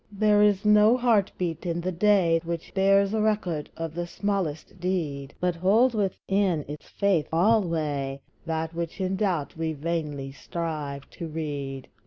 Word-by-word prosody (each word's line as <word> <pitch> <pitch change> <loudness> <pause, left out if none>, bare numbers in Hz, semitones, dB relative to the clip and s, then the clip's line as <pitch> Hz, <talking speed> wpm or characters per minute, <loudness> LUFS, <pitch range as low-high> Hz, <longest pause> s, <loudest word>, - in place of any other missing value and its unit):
There 210 0 +3
is 205 -1 +3
no 210 +3 +6
heart 230 -6 +3
beat 170 -3 -3
in 170 -1 -2
the 180 +2 -2
day, 180 -3 +3
Which 170 0 -5
bears 195 +1 +3
a 220 - +1
record 200 -8 0
of 165 -1 -4
the 175 +1 -3
smallest 185 -4 -3
deed, 155 -7 -2
But 180 -1 0
holds 220 +8 +4
within 195 -5 0
its 150 +1 -9
faith 195 -7 +1
alway 160 -8 +1 0.3
That 160 0 -2
which 170 +2 -4
in 190 0 0
doubt 185 -8 -1
we 160 -1 -2
vainly 150 -3 -3
strive 145 -2 -5
to 170 - -6
read. 145 -4 -5
170 Hz, 155 wpm, -26 LUFS, 155-200 Hz, 0.3 s, no